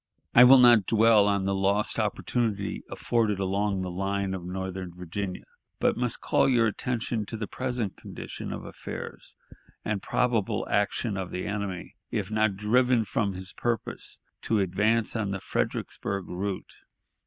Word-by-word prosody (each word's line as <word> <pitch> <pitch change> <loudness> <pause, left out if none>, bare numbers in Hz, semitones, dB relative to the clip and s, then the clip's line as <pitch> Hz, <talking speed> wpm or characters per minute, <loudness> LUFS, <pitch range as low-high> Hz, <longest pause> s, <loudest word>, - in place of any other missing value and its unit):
I 125 - +9
will 135 +2 +9
not 120 -6 +7
dwell 110 -2 +5
on 100 -2 +1
the 100 - +1
lost 100 +2 +1
opportunity 105 -4 -1
afforded 110 -4 0
along 100 0 0
the 90 - -4
line 95 +1 -1
of 95 -2 -5
northern 95 0 -5
Virginia, 90 +2 -5 0.4
but - - +2
must - - -2
call - - +3
your 120 -3 +4
attention 115 0 -1
to 115 - -5
the 110 - -3
present 125 -4 -3
condition - - -7
of - - -6
affairs - - -8 0.5
and 105 -2 -1
probable 120 -5 0
action 105 +1 0
of 95 -2 -3
the 90 - -4
enemy, 100 -3 -4 0.2
if - - -3
not 110 -2 +2
driven 120 +3 +3
from 100 -1 -1
his 95 +1 -8
purpose 120 -3 -3 0.2
to 110 - +1
advance 105 +5 +1
on 110 -3 -1
the 100 0 -2
Fredericksburg 100 0 -3
route.... 95 +2 -4
100 Hz, 155 wpm, -27 LUFS, 95-115 Hz, 0.5 s, I